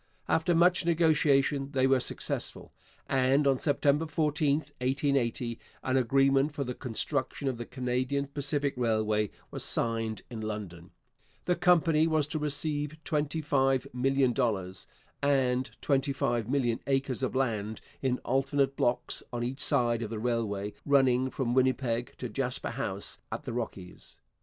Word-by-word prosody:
After 165 Hz, +2 st, +2 dB
much 175 Hz, +2 st, +4 dB
negotiation 150 Hz, -4 st, +2 dB
they 130 Hz, -1 st, +3 dB
were 135 Hz, 0 st, +4 dB
successful, 125 Hz, -, -4 dB, 0.3 s
and 135 Hz, +2 st, +3 dB
on 135 Hz, -2 st, +3 dB
September 145 Hz, +1 st, +2 dB
14, 150 Hz, -2 st, +1 dB, 0.2 s
1880, 125 Hz, -3 st, 0 dB, 0.2 s
an 130 Hz, -, 0 dB
agreement 135 Hz, +3 st, +3 dB
for 140 Hz, -, -1 dB
the 125 Hz, -1 st, -4 dB
construction 130 Hz, +3 st, -2 dB
of 130 Hz, -3 st, -2 dB
the 120 Hz, -, -5 dB
Canadian 130 Hz, +2 st, -1 dB
Pacific 140 Hz, 0 st, -1 dB
Railway 110 Hz, -3 st, +1 dB, 0.2 s
was -, -, -3 dB
signed 115 Hz, -2 st, -1 dB
in 115 Hz, -2 st, -5 dB
London. 100 Hz, -6 st, -6 dB, 0.6 s
The 180 Hz, +2 st, +2 dB
company 165 Hz, -3 st, +4 dB
was 155 Hz, -2 st, +2 dB
to 155 Hz, -, -2 dB
receive 150 Hz, 0 st, -1 dB
$25,000,000 135 Hz, -, 0 dB, 0.3 s
and 130 Hz, -3 st, +2 dB
25,000,000 130 Hz, -3 st, 0 dB
acres 135 Hz, -1 st, 0 dB
of 130 Hz, 0 st, -2 dB
land 110 Hz, -5 st, -1 dB, 0.2 s
in 130 Hz, -2 st, +1 dB
alternate 135 Hz, +1 st, +1 dB
blocks 120 Hz, -, 0 dB
on 120 Hz, -1 st, -3 dB
each 130 Hz, +3 st, -3 dB
side 120 Hz, -5 st, +3 dB
of 110 Hz, -, -3 dB
the 115 Hz, -, -4 dB
railway 105 Hz, -3 st, -2 dB
running 130 Hz, -2 st, +3 dB
from 125 Hz, -2 st, -2 dB
Winnipeg 125 Hz, -2 st, +1 dB
to -, -, -4 dB
Jasper -, -, -2 dB
House -, -, -3 dB
at -, -, -4 dB
the -, -, -5 dB
Rockies. 105 Hz, -6 st, -6 dB
135 Hz, 135 wpm, -29 LUFS, 120-145 Hz, 0.6 s, much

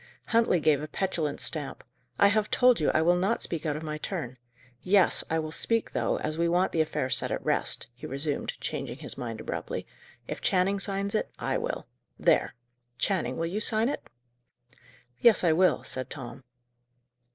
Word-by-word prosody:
Huntley 230 Hz, -6 st, +3 dB
gave 150 Hz, -2 st, +3 dB
a 155 Hz, -, -5 dB
petulant 160 Hz, -4 st, -2 dB
stamp. 150 Hz, -4 st, -1 dB, 0.3 s
"I 200 Hz, -, +6 dB
have 210 Hz, 0 st, +1 dB
told 250 Hz, -4 st, +5 dB
you 150 Hz, -, +2 dB
I 160 Hz, -, +2 dB
will 175 Hz, +2 st, +4 dB
not 195 Hz, +6 st, +1 dB
speak 165 Hz, -2 st, -2 dB
out 150 Hz, -, 0 dB
of 155 Hz, -, -5 dB
my 155 Hz, -1 st, -4 dB
turn. 140 Hz, -9 st, -5 dB, 0.4 s
Yes, 190 Hz, -1 st, +4 dB
I 160 Hz, -, +1 dB
will 155 Hz, -1 st, -3 dB
speak, 230 Hz, +7 st, 0 dB
though, -, -, 0 dB
as 155 Hz, +1 st, -3 dB
we 170 Hz, 0 st, +2 dB
want 180 Hz, +2 st, +2 dB
the 160 Hz, -, +2 dB
affair 155 Hz, -4 st, -1 dB
set -, -, +1 dB
at -, -, -3 dB
rest," -, -, 0 dB
he 120 Hz, -, -9 dB
resumed, 140 Hz, +2 st, -2 dB
changing -, -, -4 dB
his -, -, +1 dB
mind 115 Hz, -3 st, -5 dB
abruptly. -, -, -4 dB, 0.4 s
"If -, -, -5 dB
Channing 190 Hz, +2 st, +2 dB
signs 200 Hz, 0 st, -1 dB
it, 215 Hz, -, 0 dB
I -, -, -1 dB
will. -, -, -4 dB, 0.3 s
There! -, -, +2 dB, 0.4 s
Channing, 155 Hz, -11 st, 0 dB
will 165 Hz, -, -1 dB
you 185 Hz, +5 st, -2 dB
sign 220 Hz, +2 st, +2 dB
it?" -, -, -3 dB, 1.2 s
"Yes, 235 Hz, -5 st, +5 dB
I 170 Hz, -, +4 dB
will," 185 Hz, +3 st, +3 dB
said 130 Hz, 0 st, -5 dB
Tom. 130 Hz, -2 st, -8 dB
170 Hz, 185 wpm, -28 LUFS, 150-200 Hz, 1.2 s, I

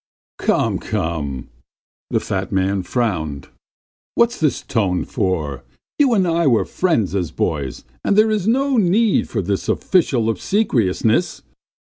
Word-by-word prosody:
He -, -, -8 dB
he!" -, -, -8 dB
"Come, -, -, +2 dB
come!" 75 Hz, -5 st, -3 dB, 0.6 s
the -, -, +1 dB
fat -, -, -3 dB
man 95 Hz, +1 st, +1 dB
frowned. 85 Hz, -, -2 dB, 0.7 s
"What's 235 Hz, +1 st, +2 dB
this 155 Hz, -3 st, 0 dB
tone 100 Hz, -7 st, 0 dB
for? 75 Hz, -8 st, -2 dB, 0.4 s
You 270 Hz, -5 st, +4 dB
and 190 Hz, -3 st, +2 dB
I 170 Hz, -1 st, +2 dB
were 120 Hz, -4 st, +3 dB
friends 140 Hz, -, 0 dB
as 90 Hz, -5 st, -1 dB
boys, 70 Hz, -4 st, -3 dB, 0.2 s
and 200 Hz, -, +1 dB
there 215 Hz, +1 st, +5 dB
is 210 Hz, -2 st, -1 dB
no 270 Hz, +3 st, +2 dB
need 210 Hz, +2 st, +2 dB
of 95 Hz, -, 0 dB
this 100 Hz, 0 st, -2 dB
official 135 Hz, -, +1 dB
obsequiousness!" 115 Hz, -, 0 dB
115 Hz, 140 wpm, -20 LUFS, -, 0.7 s, there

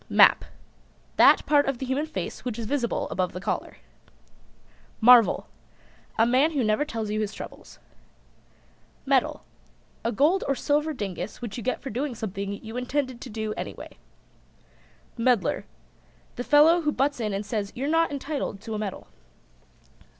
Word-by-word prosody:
MAP. -, -, +6 dB, 0.7 s
That -, -, +6 dB
part 290 Hz, -2 st, +3 dB
of 275 Hz, -2 st, -1 dB
the 265 Hz, -, -4 dB
human 270 Hz, +4 st, -1 dB
face 315 Hz, -, -5 dB
which 245 Hz, -3 st, -4 dB
is 230 Hz, -, -4 dB
visible 240 Hz, 0 st, -1 dB
above 185 Hz, -2 st, -1 dB
the 180 Hz, -, -5 dB
collar. 195 Hz, -, -3 dB, 1.2 s
MARVEL. 235 Hz, -1 st, +6 dB, 0.7 s
A 225 Hz, -, +5 dB
man 265 Hz, +7 st, +3 dB
who 275 Hz, -4 st, +1 dB
never 215 Hz, +5 st, +2 dB
tells 225 Hz, -8 st, -4 dB
you 215 Hz, -, -1 dB
his 215 Hz, 0 st, -3 dB
troubles. -, -, -10 dB, 1.3 s
MEDAL. 270 Hz, -2 st, +1 dB, 0.6 s
A 230 Hz, -, 0 dB
gold 300 Hz, -, +2 dB
or 275 Hz, -, +1 dB
silver 300 Hz, +3 st, 0 dB
dingus 195 Hz, -, -5 dB
which 235 Hz, -4 st, -6 dB
you 240 Hz, -, -5 dB
get 255 Hz, -, -2 dB
for 270 Hz, -, -5 dB
doing 255 Hz, +3 st, -3 dB
something 200 Hz, -2 st, -4 dB
you 220 Hz, +2 st, -6 dB
intended 255 Hz, -1 st, -2 dB
to 260 Hz, -, -8 dB
do 220 Hz, -1 st, -3 dB
anyway. -, -, -8 dB, 1.2 s
MEDDLER. 240 Hz, -3 st, +1 dB, 0.7 s
The 245 Hz, -, -4 dB
fellow 310 Hz, +6 st, +5 dB
who 300 Hz, -2 st, +1 dB
butts 285 Hz, -1 st, 0 dB
in 215 Hz, -2 st, -1 dB
and 200 Hz, +1 st, -3 dB
says 205 Hz, -2 st, -3 dB
you're 265 Hz, +3 st, -3 dB
not 325 Hz, +2 st, +2 dB
entitled 280 Hz, -7 st, -4 dB
to 225 Hz, 0 st, -6 dB
a 215 Hz, -, -3 dB
medal. 210 Hz, -3 st, -5 dB
245 Hz, 155 wpm, -26 LUFS, 215-285 Hz, 1.3 s, MAP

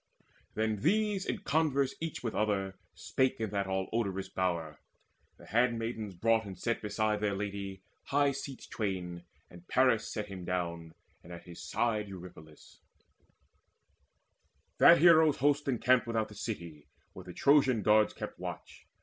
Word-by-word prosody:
Then 110 Hz, 0 st, 0 dB
these 205 Hz, -, +1 dB
in -, -, -3 dB
converse 140 Hz, -2 st, +1 dB
each 165 Hz, -5 st, -5 dB
with 115 Hz, -, -2 dB
other 100 Hz, -3 st, 0 dB, 0.2 s
spake 130 Hz, +10 st, 0 dB
In 110 Hz, -3 st, -2 dB
that 100 Hz, -1 st, -1 dB
all 95 Hz, 0 st, -1 dB
odorous 100 Hz, -4 st, -2 dB
bower. 85 Hz, -5 st, -2 dB, 0.6 s
The -, -, -15 dB
handmaids 115 Hz, -3 st, -1 dB
brought 115 Hz, +4 st, +2 dB
And 95 Hz, -3 st, -8 dB
set 115 Hz, 0 st, -2 dB
beside 105 Hz, 0 st, 0 dB
their 105 Hz, -2 st, 0 dB
lady 100 Hz, -1 st, -5 dB, 0.2 s
high 145 Hz, 0 st, +2 dB
seats 140 Hz, 0 st, -7 dB
twain; 90 Hz, -5 st, -4 dB, 0.2 s
And 90 Hz, 0 st, -15 dB
Paris 125 Hz, -4 st, +2 dB
sat 105 Hz, -, -3 dB
him 95 Hz, -3 st, -8 dB
down, 85 Hz, -2 st, -3 dB, 0.3 s
and 90 Hz, -, -13 dB
at 85 Hz, -, -9 dB
his 85 Hz, -1 st, -11 dB
side 110 Hz, -3 st, -1 dB
Eurypylus. 85 Hz, -5 st, -12 dB, 2.0 s
That -, -, +9 dB
hero's 160 Hz, -2 st, +6 dB
host 145 Hz, +1 st, +1 dB
encamped 125 Hz, -1 st, +2 dB
Without 115 Hz, -2 st, -1 dB
the -, -, -11 dB
city, 85 Hz, -11 st, -6 dB, 0.3 s
where -, -, -10 dB
the -, -, -9 dB
Trojan 135 Hz, -6 st, +3 dB
guards 105 Hz, 0 st, +4 dB
Kept -, -, -7 dB
watch. -, -, -8 dB
105 Hz, 150 wpm, -31 LUFS, 95-125 Hz, 2.0 s, That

